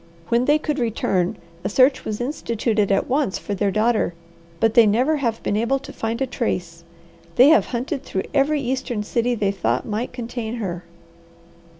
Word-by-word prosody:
When 235 +2 +2
they 295 +2 +4
could 300 -1 -2
return, 195 -6 0 0.3
a - - -1
search 260 +6 +3
was 210 -1 -3
instituted 230 -5 -1
at 195 - +2
once 270 -6 0
for 205 - -5
their 200 +1 0
daughter, 215 -3 +1 0.4
but 225 0 +2
they 230 -2 +7
never 255 +9 +2
have 235 -5 -2
been 205 - 0
able 235 +5 +1
to 270 - -10
find 225 +1 -3
a - - +1
trace. 180 -9 -3 0.5
They 255 +4 +7
have 315 - +5
hunted 260 +3 -3
through 190 -8 -3
every 290 +1 +2
eastern 250 -4 -2
city 240 +3 0
they 200 -3 0
thought 125 - -1
might 220 +3 -3
contain 240 -2 -5
her." 180 -6 -4
235 Hz, 180 wpm, -22 LUFS, 210-260 Hz, 0.5 s, they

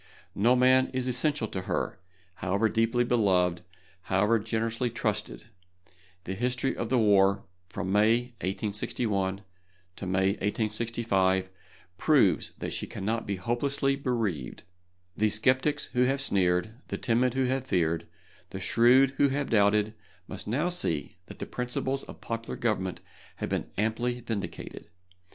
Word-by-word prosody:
No 115 +5 +3
one 125 - +2
man 130 0 +5
is 130 0 0
essential 130 0 0
to 95 - -4
her, 110 -1 -2 0.3
however 100 +5 0
deeply 115 +2 +2
beloved, 95 -8 +2 0.5
however 105 +4 +3
generously 115 +3 -1
trusted. 105 -2 -3 0.8
The 95 - -4
history 125 +5 -1
of 115 - -3
the 130 - +2
war 100 -3 +4 0.3
from 95 - -4
May, 115 +4 +3
1861, 100 0 -2 0.5
to - - -5
May, 95 +1 +2
1865, 105 -3 0 0.5
proves - - +3
that - - -4
she - - -3
cannot 110 +4 -3
be 100 - -1
hopelessly 135 +7 0
bereaved. 115 - -2 0.5
The 110 0 +2
sceptics 130 +7 +2
who 125 - +2
have 135 +2 +1
sneered, 95 -1 +1
the - - -3
timid 120 +1 +1
who 135 - +2
have 130 +1 -1
feared, 85 -2 0 0.4
the - - -6
shrewd 130 +3 +4
who 140 - +5
have 140 0 -2
doubted, 105 0 +3 0.3
must - - -7
now 145 +11 0
see 85 - -2
that - - -11
the - - -5
principles 130 +2 -2
of - - -12
popular 115 0 -4
government 105 -7 -1 0.3
have - - -4
been - - -2
amply 120 +4 -1
vindicated. 110 -4 -6
115 Hz, 140 wpm, -28 LUFS, 100-125 Hz, 0.8 s, man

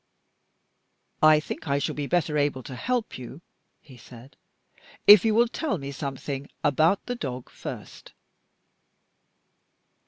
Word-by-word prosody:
"I 155 0 +7
think 155 - -7
I 140 0 +1
shall 140 - -2
be 145 -1 -4
better 165 -2 0
able 145 -3 0
to 130 - -9
help 235 - -2
you," 130 +5 -10 0.4
he 130 -4 -16
said, 120 +3 -14 0.7
"if 205 -2 +9
you 220 -2 +2
will 235 +1 +4
tell 275 - -2
me 140 -2 -6
something 140 0 -5
about 155 +6 +2
the 245 - -3
dog 130 - -6
first." - - -9
145 Hz, 130 wpm, -26 LUFS, 135-180 Hz, 0.7 s, if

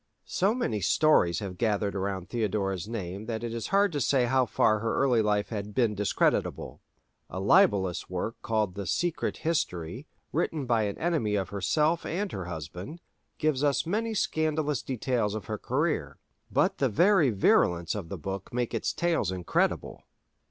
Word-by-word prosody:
So 200 +5 +1
many 110 - -1
stories 95 - +3
have 95 -3 -6
gathered 105 -3 +1
around 95 -2 -3
Theodora's 100 -5 -1
name 100 -2 -5
that 115 -1 -3
it 115 -1 -3
is 115 -2 -4
hard 200 0 +3
to 145 -3 -2
say 130 0 +3
how 130 +1 +2
far 110 0 +2
her 115 +1 -1
early 125 -4 +3
life 105 -1 +1
had 105 -2 -5
been 120 -4 +2
discreditable. 105 0 0 0.5
A 95 - -5
libellous 100 - +3
work 105 +6 -4
called 110 -4 0
the 100 -1 -5
"Secret 175 - -1
History," 120 - -2 0.2
written 155 -3 -1
by 115 -3 +2
an 100 - -3
enemy 155 -12 0
of 95 -2 -1
herself 150 - +1
and 195 +4 -2
her 95 -3 -5
husband,(4) 90 - -7 0.4
gives 150 -3 0
us 145 +1 +2
many 220 +6 -1
scandalous 155 - 0
details 120 -4 -1
of 105 -4 -5
her 105 -1 -4
career; - - -1 0.3
but - - +1
the 135 - +2
very 175 - +4
virulence 90 -5 +2
of 95 -6 -5
the 100 - -5
book 95 +3 -6
makes 120 -1 -2
its - - -1
tales 170 - 0
incredible. 90 -2 -1
110 Hz, 165 wpm, -28 LUFS, 100-150 Hz, 0.5 s, very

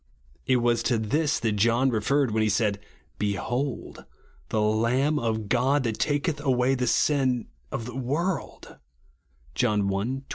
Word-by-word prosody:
It 130 - +4
was 120 -1 +2
to 120 0 +1
this 145 +8 0
that 115 -2 +1
John 115 +5 +3
referred 125 +4 +1
when 110 +1 +1
he 110 - +2
said, 105 -1 +1 0.4
"Behold 115 +7 -3 0.5
the 110 - 0
Lamb 115 +8 +1
of 110 -2 -2
God, 130 +5 +2
that 115 -3 -2
taketh 145 +1 0
away 130 -2 +2
the 125 -1 -1
sin 130 -3 +1 0.2
of 115 - -4
the 125 0 -8
world," 150 +8 -3 0.8
(John 110 -4 +1
i, 100 - 0
29). 120 +8 -2
120 Hz, 150 wpm, -26 LUFS, 110-135 Hz, 0.8 s, It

